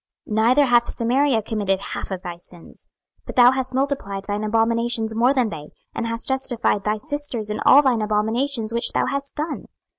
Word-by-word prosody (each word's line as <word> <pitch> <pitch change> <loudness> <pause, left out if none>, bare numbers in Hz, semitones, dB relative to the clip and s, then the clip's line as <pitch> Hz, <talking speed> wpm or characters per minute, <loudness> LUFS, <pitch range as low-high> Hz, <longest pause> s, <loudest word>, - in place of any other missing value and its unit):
26:016:051 210 - -3
Neither 255 +5 +4
hath 240 -2 +3
Samaria 250 +1 +1
committed 200 -3 -1
half - - -6
of 190 -2 -5
thy 175 -2 -6
sins; 175 0 -14 0.4
but - - -7
thou 245 0 +7
hast 260 -1 -3
multiplied 260 -8 -2
thine 205 +1 -3
abominations 225 +1 +1
more 240 +3 +3
than 255 -5 +1
they, 150 -4 -8 0.2
and 230 - -3
hast 230 0 -4
justified 245 -6 0
thy 210 +1 0
sisters 285 -5 -5
in 210 - -3
all 285 +2 +8
thine 250 -5 +2
abominations 220 +3 -1
which 235 +1 -1
thou - - +1
hast 280 0 -4
done. 305 0 -4
230 Hz, 185 wpm, -22 LUFS, 210-265 Hz, 0.4 s, all